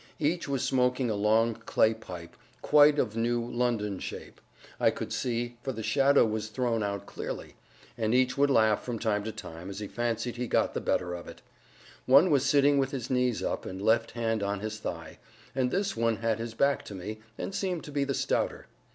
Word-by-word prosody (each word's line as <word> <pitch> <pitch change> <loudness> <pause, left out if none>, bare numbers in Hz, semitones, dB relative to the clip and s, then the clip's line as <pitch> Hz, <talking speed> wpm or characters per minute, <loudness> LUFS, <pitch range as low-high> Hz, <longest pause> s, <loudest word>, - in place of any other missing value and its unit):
Each 160 +2 0
was 135 -2 -1
smoking 125 -2 +1
a - - -1
long 110 +3 +3
clay 110 0 +2
pipe, 90 -6 -10 0.3
quite 150 0 +6
of 110 -6 0
new 120 +1 +1
London 120 -5 -1
shape, - - -8 0.4
I - - +5
could - - -4
see, 120 -1 -2
for 135 - -3
the 110 -1 -6
shadow 140 +2 +4
was 110 -1 -2
thrown 115 0 -1
out 100 -1 -3
clearly; - - -6 0.5
and 110 +1 +1
each 125 0 +3
would 140 +1 +3
laugh 110 -5 +4
from 120 -2 -3
time 105 -2 0
to 110 - -3
time 95 -5 -9
as 100 - -7
he 105 0 -4
fancied 120 +1 -2
he 125 0 -2
got - - +1
the - - -2
better 90 -1 0
of 85 -1 -7
it. - - -11 0.6
One 140 +7 +6
was 140 -3 +4
sitting 140 0 +4
with 135 -1 +1
his 130 -3 -5
knees 125 -2 +1
up, - - -2
and 95 - -6
left 110 +3 +2
hand 115 -2 -1
on 100 0 -2
his 110 0 -4
thigh; 85 -6 -6 0.3
and 130 -1 +1
this 195 +7 -1
one 115 0 +1
had 115 0 -1
his 115 0 -5
back 140 +3 +2
to 100 - -8
me, 105 +4 -6 0.2
and - - -4
seemed 185 -4 -2
to 150 - -9
be 140 -1 0
the 140 -1 -1
stouter. - - -1
115 Hz, 210 wpm, -29 LUFS, 110-135 Hz, 0.6 s, quite